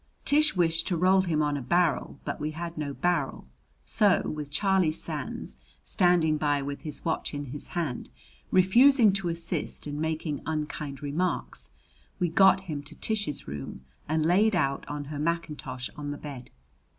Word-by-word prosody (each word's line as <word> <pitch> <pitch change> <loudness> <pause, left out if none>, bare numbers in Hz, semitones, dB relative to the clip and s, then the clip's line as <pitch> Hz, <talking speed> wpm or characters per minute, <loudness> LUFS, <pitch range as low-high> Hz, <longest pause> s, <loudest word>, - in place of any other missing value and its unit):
Tish 305 -1 +4
wished 165 -2 +2
to 175 - 0
roll 185 +3 +4
him 160 -5 0
on 145 -1 0
a 140 - -3
barrel, 155 0 +1
but - - -3
we 150 - -2
had 170 0 -5
no 150 -2 -3
barrel; 175 +5 -1 0.4
so, 205 -4 +4
with 150 -2 -4
Charlie 190 +1 +2
Sands 150 - -4 0.3
standing 175 -4 +3
by 145 -1 +1
with 140 0 -5
his 150 -2 -5
watch 160 -2 -1
in 145 0 -4
his 145 - -6
hand, 150 -8 -2 0.4
refusing 225 +4 +6
to 195 -3 -1
assist 170 0 -2
and 145 0 -4
making 160 -2 -2
unkind 150 -3 -4
remarks, 160 +6 -2 0.5
we 175 - +1
got 190 +2 +5
him 155 -6 -5
to 145 - -12
Tish's 205 -10 -2
room 70 -2 -7 0.2
and 155 0 +1
laid 200 +5 +4
out 140 -5 0
on 145 0 -4
her 145 0 -6
mackintosh 150 -5 -3
on 145 -1 -5
the 145 - -4
bed. 140 -5 -9
160 Hz, 165 wpm, -28 LUFS, 145-180 Hz, 0.5 s, refusing